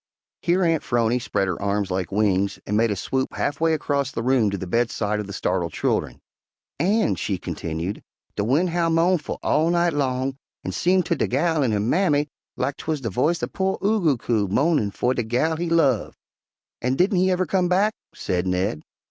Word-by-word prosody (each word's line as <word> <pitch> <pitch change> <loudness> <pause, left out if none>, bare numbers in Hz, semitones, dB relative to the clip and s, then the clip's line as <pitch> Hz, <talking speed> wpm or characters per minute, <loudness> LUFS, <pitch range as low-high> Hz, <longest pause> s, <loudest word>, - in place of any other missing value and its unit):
Here 180 +2 +2
Aunt 165 -3 +2
'Phrony 120 0 +1
spread 100 -4 -1
her 90 0 -3
arms 100 -1 -1
like 95 +1 -2
wings 100 -1 +1
and 105 - -1
made 115 +2 +3
a 105 - 0
swoop 130 +7 -2
half 145 +1 -2
way 165 -1 +3
across 140 -3 -1
the 115 - -4
room 125 -4 +3
to 100 - -3
the 95 - -5
bedside 105 0 0
of 105 - -4
the - - -7
startled 90 -4 -1
children. - - -1 0.6
"An'," 205 +7 +2
she 100 - -2
continued, 85 +1 -4 0.3
"de 100 - -1
wind 150 - +2
howl 170 -1 +1
mo'nful 165 0 +1
all 160 +2 +2
night 170 -1 +2
long, 135 -1 -1 0.3
an' - - -3
seem 185 +1 +2
ter - - 0
de - - 0
gal 155 +3 +1
an' 125 - +1
her 105 - +1
mammy 145 - +2 0.3
lak 135 +2 -1
'twuz 155 -3 -3
de 115 -4 -3
voice 155 - +1
of - - -3
po' 190 0 0
Oo 215 +1 +2
goo 150 -7 +3
coo 110 -3 0
mo'nin' 140 - +2
fer 120 +5 0
de 125 - -1
gal 125 +8 0
he 170 +1 -2
love." 145 -9 +2 0.6
"And 130 +2 0
didn't 185 +1 +3
he 185 +1 +3
ever 185 0 +1
come 180 -2 +1
back?" 200 +4 +3 0.2
said 90 0 -2
Ned. 90 -3 -1
130 Hz, 205 wpm, -23 LUFS, 105-165 Hz, 0.6 s, made